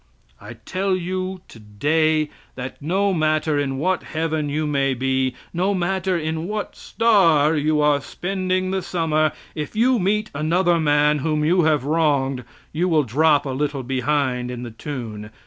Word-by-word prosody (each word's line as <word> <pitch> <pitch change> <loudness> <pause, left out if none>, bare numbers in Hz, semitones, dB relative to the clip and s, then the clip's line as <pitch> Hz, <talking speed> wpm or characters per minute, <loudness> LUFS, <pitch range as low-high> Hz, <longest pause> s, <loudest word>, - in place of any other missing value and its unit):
I - - -10
tell 185 - -2
you 185 +1 -3
today, 150 +9 0 0.2
that 130 +2 -7
no 190 +6 +1
matter 155 -2 +1
in 135 -2 -2
what 185 +6 0
heaven 160 -2 -2
you 155 +2 -1
may 140 -2 +1
be, 130 0 0 0.2
no 185 +4 +1
matter 185 0 0
in 160 +1 -3
what 210 0 -4
star 165 -9 +3
you 150 0 +1
are 145 -1 +3
spending 185 +2 -2
the 190 0 -1
summer; 155 -3 0 0.2
if 150 +4 -5
you 245 +2 +3
meet 210 +3 0
another 170 +4 +2
man 150 -1 +3
whom 150 +1 0
you 175 +1 +3
have 150 -4 +2
wronged, 140 -4 +1 0.3
you 175 +4 0
will 155 -3 +3
drop 145 +4 +2
a 135 - -3
little 140 0 -2
behind 130 -1 -1
in 125 -1 -6
the 120 - -7
tune. 110 -4 -6
155 Hz, 160 wpm, -22 LUFS, 140-180 Hz, 0.3 s, star